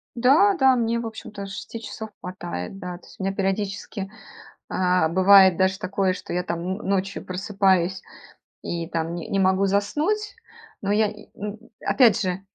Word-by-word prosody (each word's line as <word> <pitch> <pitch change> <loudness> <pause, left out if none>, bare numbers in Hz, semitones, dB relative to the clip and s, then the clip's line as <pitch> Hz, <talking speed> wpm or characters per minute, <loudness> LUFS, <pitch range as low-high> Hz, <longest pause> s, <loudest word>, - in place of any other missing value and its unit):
Да, 285 - +5
да, 265 -5 +5
мне, 235 -1 0
в 235 - -4
общем-то, 215 -2 -7
6 195 +4 -7
часов 220 +1 -7
хватает, 180 - -6
да. 180 -1 -6
То 175 - -19
есть - - -17
у 190 - -4
меня 195 - 0
периодически, 195 0 -2 0.6
э, 180 -3 +2
бывает 190 +1 +7
даже 190 +1 +2
такое, 190 0 0
что 185 - -7
я, 180 +1 0
там, 170 -2 -3
н 185 +4 -4
ночью 195 0 -1
просыпаюсь 190 -1 +1 0.6
и, 170 -1 -4
там, 165 0 -2
ни 170 - -5
не 195 - 0
могу 190 +1 +3
заснуть. 300 - 0 0.5
Но 200 - -1
я 215 +1 +3
и, 210 0 -13
м 210 +1 -5 0.2
Опять 225 -5 +4
же, 185 0 -2
195 Hz, 170 wpm, -24 LUFS, 185-210 Hz, 0.6 s, бывает